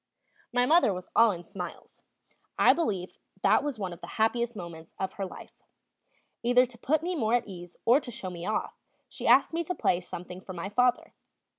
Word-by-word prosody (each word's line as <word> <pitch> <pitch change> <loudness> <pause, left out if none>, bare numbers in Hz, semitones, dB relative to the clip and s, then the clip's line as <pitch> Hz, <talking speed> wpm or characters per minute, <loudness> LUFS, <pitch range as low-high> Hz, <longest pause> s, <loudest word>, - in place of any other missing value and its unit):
My 245 0 +3
mother 320 -4 +5
was 180 - -7
all 230 0 +7
in 175 -4 -3
smiles; 180 -1 -8 0.6
I - - +6
believe 195 - -2 0.2
that - - +4
was 290 -4 -3
one 190 -4 -4
of 170 - -13
the - - -8
happiest 235 +2 +1
moments 170 -4 -9
of 190 -1 -3
her 195 -1 -4
life. - - -11 0.9
Either 245 +1 +5
to 245 -1 -13
put 305 +5 +1
me 360 +1 -1
more 230 -6 +2
at 240 -2 0
ease 175 -3 -10
or 245 +5 +6
to 265 - -9
show 230 -6 -5
me 170 -1 -7
off, 215 - -2 0.3
she - - -5
asked 265 +6 +5
me 335 +1 0
to 360 +3 -3
play 180 - +1
something 180 +1 -8
for 190 - -8
my 180 +2 -5
father. 250 +3 +1
220 Hz, 200 wpm, -28 LUFS, 180-250 Hz, 0.9 s, all